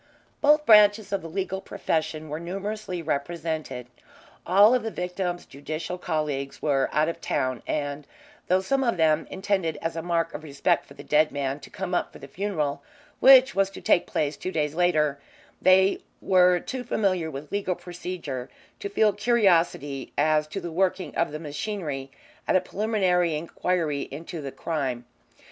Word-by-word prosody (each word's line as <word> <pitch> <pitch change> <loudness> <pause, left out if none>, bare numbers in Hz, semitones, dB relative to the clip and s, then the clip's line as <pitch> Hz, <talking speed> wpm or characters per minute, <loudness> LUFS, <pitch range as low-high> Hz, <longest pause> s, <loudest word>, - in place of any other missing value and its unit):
Both 300 +1 +5
branches 210 -1 +6
of 195 - 0
the 165 - -8
legal 190 +2 -3
profession 155 -3 -2
were 150 +1 -4
numerously 190 +1 -4
represented. 155 -3 -3 0.6
All 200 +6 +6
of 250 - +2
the 225 - -3
victim's 180 -2 -3
judicial 155 +6 -6
colleagues 150 -5 -2
were 135 -3 +1
out 155 +1 +2
of 170 - -4
town, 130 -2 -1
and 145 -1 -3 0.4
though 185 +1 +3
some 270 +8 0
of 235 -6 +1
them 160 -1 +2
intended 190 -5 -1
as 165 0 -3
a 165 - -2
mark 165 -1 -1
of - - -6
respect 140 -3 0
for 140 - -14
the - - -10
dead 150 +1 +3
man 140 0 -2
to 140 - -12
come 185 -1 -5
up 175 - 0
for - - -12
the 140 - -11
funeral, 155 -6 -2 0.4
which 265 0 +8
was 195 0 +2
to 195 - -10
take 175 - +2
place 150 -1 -1
two 185 - -4
days 150 -4 -1
later, 155 -5 +2 0.4
they 190 +1 +5 0.2
were 180 -1 +4
too 260 +6 -5
familiar 185 -8 0
with 145 0 -8
legal 195 -3 -1
procedure 175 -8 -6 0.3
to 200 - -4
feel 210 +1 +3
curiosity 175 - +1
as 155 +1 +2
to 195 - -5
the 170 -2 -6
working 185 +2 0
of 165 - +1
the 150 - -4
machinery 150 -3 -4 0.4
at - - +2
a - - +6
preliminary 185 -4 +1
inquiry 160 -2 -1
into 160 +3 -7
the 140 -2 -5
crime. 130 -7 -3
170 Hz, 170 wpm, -26 LUFS, 150-190 Hz, 0.6 s, which